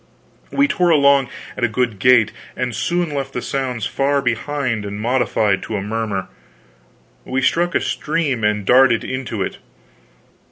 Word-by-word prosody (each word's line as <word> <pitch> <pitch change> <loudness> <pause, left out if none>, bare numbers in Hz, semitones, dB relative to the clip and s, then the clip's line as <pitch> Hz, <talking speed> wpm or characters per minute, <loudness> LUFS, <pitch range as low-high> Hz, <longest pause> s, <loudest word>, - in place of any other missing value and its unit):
We 280 +1 +3
tore 180 -10 +1
along 140 -4 +4 0.3
at 125 - -5
a - - +5
good 115 -2 -1
gait, 125 0 +5 0.3
and 125 -1 -2
soon 175 -3 -1
left 135 -1 -3
the 125 - -3
sounds 125 -5 -2
far 140 +1 +1
behind 125 -2 -1
and 100 0 -6
modified 110 -4 +1
to 110 - -5
a - - -3
murmur. 105 -2 -3 1.0
We 130 0 -2
struck 175 +5 +1
a - - +4
stream 150 -7 -1
and 105 -1 +1
darted 125 0 +5
into 130 -3 -3
it. - - -6
125 Hz, 155 wpm, -19 LUFS, 110-140 Hz, 1.0 s, a